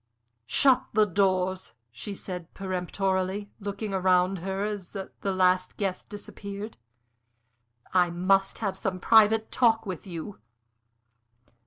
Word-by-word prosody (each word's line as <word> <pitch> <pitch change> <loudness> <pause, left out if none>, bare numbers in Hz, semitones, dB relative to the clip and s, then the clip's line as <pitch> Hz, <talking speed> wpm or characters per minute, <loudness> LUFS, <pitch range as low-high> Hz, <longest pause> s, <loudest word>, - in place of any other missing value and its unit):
"Shut 270 -2 +4
the 215 0 +5
doors!" 185 - 0 0.2
she 160 - -6
said, 180 -3 -7
peremptorily, 190 +1 -2
looking 200 +1 -4
round 185 0 +2
her 190 +3 -3
as 205 -4 -4
the 195 -1 -6
last 185 -1 +2
guest 195 -3 -3
disappeared. 205 0 -8 1.2
"I 180 -1 +4
must 195 +3 +2
have 195 -4 -2
some 190 -1 -3
private 220 +2 +5
talk 225 -3 +3
with 185 -1 -6
you. 180 +3 -7
195 Hz, 115 wpm, -27 LUFS, 185-205 Hz, 1.2 s, the